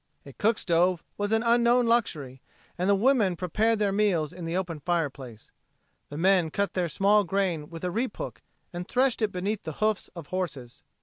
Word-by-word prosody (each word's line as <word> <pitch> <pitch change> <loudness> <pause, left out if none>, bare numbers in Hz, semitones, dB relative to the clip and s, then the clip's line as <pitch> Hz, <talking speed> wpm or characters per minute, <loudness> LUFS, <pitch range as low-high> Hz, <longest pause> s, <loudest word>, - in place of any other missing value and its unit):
A - - -11
cook 220 +1 +1
stove 175 0 +1
was 205 0 -2
an 225 +1 +2
unknown 235 +1 +4
luxury, 155 - 0 0.3
and 180 +2 -1
the 200 - +5
women 215 -4 +3
prepared 215 +6 +1
their 205 -1 +1
meals 195 -7 +1
in 175 -1 -7
the 165 +2 -2
open 170 -4 -3
fireplace. 140 -9 -3 0.6
The 145 - -7
men 180 -1 +3
cut 200 +3 -1
their 180 -2 -1
small 205 +6 +3
grain 175 -5 -1
with 165 0 -9
a 180 - -1
reap 240 +7 -2
hook - - -6 0.3
and 175 +1 -5
threshed 255 -2 +1
it 215 -2 +1
beneath 195 +3 -2
the 160 - -6
hoofs 215 +4 0
of 165 -4 -9
horses. 145 -10 -5
185 Hz, 190 wpm, -27 LUFS, 165-215 Hz, 0.6 s, the